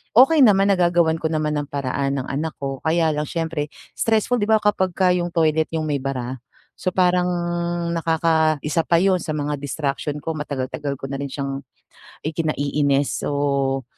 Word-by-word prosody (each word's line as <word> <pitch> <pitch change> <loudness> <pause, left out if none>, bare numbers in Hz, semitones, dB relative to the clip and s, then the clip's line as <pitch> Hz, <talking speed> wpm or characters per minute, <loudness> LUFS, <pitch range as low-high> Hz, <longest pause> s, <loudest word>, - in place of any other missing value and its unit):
Okey 270 +6 +7
naman, 200 -2 +5
nagagawan 170 -3 +3
ko 160 - 0
naman 155 -1 0
ng 145 -1 -2
paraan, 140 0 -1
ng 130 - -5
anak 155 +3 -3
ko, 135 -1 -4
kaya 160 0 +2
lang 150 -1 -2
siyempre 160 -3 -2 0.3
stressful 225 +2 +1
di 205 - 0
ba, 220 -1 +5
kapagka 190 -3 +2
yung 175 -1 -2
toilet 160 -1 +1
yung 155 -1 -1
may 145 -2 0
bara. 130 -2 -3 0.5
So, 185 - +1
parang 180 -1 +2 0.7
nakaka 160 -1 +2
isa 155 +2 +1
pa 170 - +2
yun 185 0 +3
sa 155 - -4
mga 145 0 -2
distraction 145 0 -3
ko. 160 +2 -4
Matagal-tagal 140 -1 -4
ko 135 - -7
na 135 +1 -4
rin 140 - -4
siyang 140 0 -4 0.6
ikinaiinis 145 -3 0
o 140 -2 0
155 Hz, 165 wpm, -22 LUFS, 140-175 Hz, 0.7 s, Okey